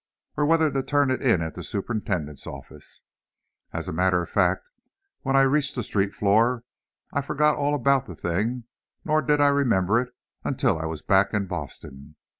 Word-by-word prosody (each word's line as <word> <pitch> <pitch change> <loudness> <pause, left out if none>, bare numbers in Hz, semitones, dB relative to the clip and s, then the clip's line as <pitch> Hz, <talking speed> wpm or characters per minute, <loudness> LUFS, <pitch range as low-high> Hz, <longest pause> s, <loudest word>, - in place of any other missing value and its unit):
or 145 0 +1
whether 160 -1 +3
to 135 - 0
turn 145 0 +1
it 130 - -1
in 115 -11 +3
at 80 - -5
the - - -8
superintendent's 95 - -3
office. 70 -1 -11 0.7
As - - -5
a - - -4
matter 90 +2 +2
of - - -10
fact, - - +1 0.5
when 135 0 0
I 135 - +6
reached 140 +1 +2
the 125 - -2
street 100 -1 -1
floor 115 +4 +2 0.5
I 140 - +1
forgot 150 +2 +2
all 145 0 0
about 135 -1 +2
the - - -8
thing, 110 +9 -2 0.4
nor 155 0 +2
did 150 -1 +2
I 145 0 +5
remember 115 -6 +2
it 125 0 -7 0.3
until 80 - 0
I 80 - -3
was 80 -1 -6
back 95 +2 +3
in 100 -1 0
Boston. 70 -4 -8
120 Hz, 185 wpm, -25 LUFS, 95-140 Hz, 0.7 s, I